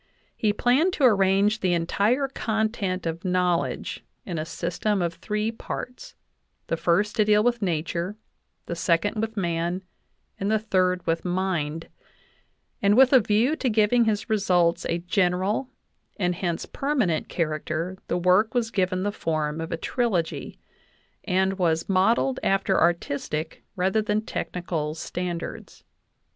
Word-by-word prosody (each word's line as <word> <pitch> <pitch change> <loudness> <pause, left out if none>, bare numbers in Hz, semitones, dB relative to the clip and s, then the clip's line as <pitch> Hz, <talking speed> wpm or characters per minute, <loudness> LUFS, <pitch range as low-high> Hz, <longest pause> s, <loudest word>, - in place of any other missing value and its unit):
He 215 - +1
planned 260 - +2
to 295 - -2
arrange 200 -1 +4
the 180 -3 +1
entire 210 +11 +1
content 220 -7 -2
of 165 0 -3
knowledge 180 -2 0 0.2
in 170 -4 -3
a 155 - -3
system 180 +5 -1
of 170 -1 -1
three 210 +5 -2
parts, 250 - -7 0.5
the - - -1
first 180 +6 +1
to 215 - +4
deal 210 0 +4
with 240 -1 +1
Nature, 170 +2 -2 0.5
the 170 - -4
second 170 +5 +1
with 225 0 -4
Man, 175 0 -1 0.6
and 195 - -1
the 220 - +3
third 185 -4 0
with 165 0 0
Mind; 175 -4 -2 0.9
and 205 +2 +4
with 265 +1 +6
a 260 - +9
view 225 +7 +2
to 260 - 0
giving 225 +2 +3
his 210 -2 0
results 180 -6 +2
a 170 - +1
"general, 185 +6 0 0.5
and 180 -4 +1
hence 175 -1 -2
permanent, 250 - -1
character, 160 +2 -2
the - - 0
work 185 +6 +3
was 230 -2 0
given 185 -2 0
the 205 - 0
form 155 -4 -2
of 165 - -5
a 165 - -1
trilogy," 195 -4 -2 0.7
and 190 0 +1
was 165 -2 +1
"modeled 225 +7 +2
after 195 0 +1
artistic 160 -2 -1
rather 190 +4 +1
than 210 +1 -1
technical 160 -4 -3
standards." 175 +1 -5
190 Hz, 140 wpm, -25 LUFS, 170-215 Hz, 0.9 s, a